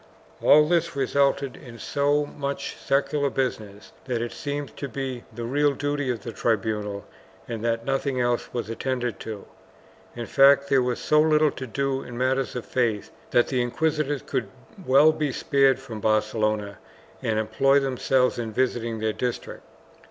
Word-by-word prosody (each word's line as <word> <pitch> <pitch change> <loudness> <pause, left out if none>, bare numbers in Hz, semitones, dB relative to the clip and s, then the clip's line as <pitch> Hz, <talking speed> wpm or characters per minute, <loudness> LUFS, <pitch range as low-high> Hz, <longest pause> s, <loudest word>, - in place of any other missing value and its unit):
All 150 +1 +6
this 170 -1 +1
resulted 140 0 +1
in 120 -3 -12
so 145 +3 +1
much 140 -1 -5
secular 140 +1 0
business 110 -6 -4
that 125 -3 -1
it 120 0 -3
seemed 145 -1 -5
to 140 - -5
be 130 0 -5
the 115 +1 -7
real 145 +4 +2
duty 145 -1 -2
of 120 -3 -2
the 120 - -5
tribunal 105 -3 -1 0.4
and 115 -2 -5
that 115 0 -1
nothing 135 0 -1
else 120 -1 0
was 120 -4 -3
attended 120 0 -3
to 110 -3 -7 0.3
— - - -27
in 120 -1 -5
fact 140 +1 +5
there 135 -1 +4
was 125 -1 -1
so 150 0 +3
little 155 -1 +4
to 130 - -7
do 135 +3 -1
in 120 -1 -9
matters 130 +1 0
of 125 - -4
faith 115 -5 -1 0.2
that 120 - +3
the 130 -2 +1
inquisitors 145 +3 -1
could 115 -6 -2 0.4
well 140 +4 +6
be 155 -3 -2
spared 135 0 +3
from 120 -5 -8
Barcelona 110 -1 0 0.4
and 110 -1 0
employ 135 +6 +3
themselves 130 -1 +1
in 115 -2 -3
visiting 115 -1 -1
their 110 0 -1
district. 125 +1 -4
130 Hz, 165 wpm, -25 LUFS, 115-140 Hz, 0.4 s, All